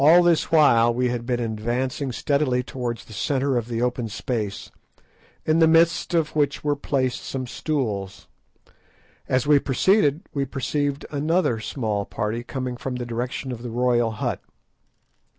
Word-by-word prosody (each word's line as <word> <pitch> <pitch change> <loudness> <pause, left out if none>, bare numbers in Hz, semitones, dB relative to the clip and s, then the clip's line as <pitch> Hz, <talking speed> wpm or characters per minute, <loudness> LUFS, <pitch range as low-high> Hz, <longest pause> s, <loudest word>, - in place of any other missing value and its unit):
All 170 +4 +7
this 170 -2 +2
while 120 -7 +5
we 125 +1 0
had 120 -1 -3
been 125 -1 0
advancing 120 +4 -2
steadily 135 -1 +1
towards 120 -4 -5
the 110 - -12
centre 135 +6 0
of 120 -2 -1
the 120 0 -2
open 125 -1 -1
space, 105 -2 -4 0.7
in 155 +1 +3
the 160 - +6
midst 165 +2 +3
of 160 -2 0
which 145 -2 +1
were 145 -1 +1
placed 135 -3 -1
some 130 -1 -4
stools. 115 -9 -3 1.0
As 130 -1 +2
we 145 -1 +5
proceeded 150 - +2
we 140 - 0
perceived 140 +1 -2
another 155 -4 +1
small 105 -3 -2
party 110 +1 -3
coming 125 -1 -4
from 130 +1 -4
the 125 -1 -4
direction 125 +3 -4
of 120 -2 -6
the 120 - -5
royal 120 0 +2
hut. 110 - -3
130 Hz, 155 wpm, -24 LUFS, 120-145 Hz, 1.0 s, All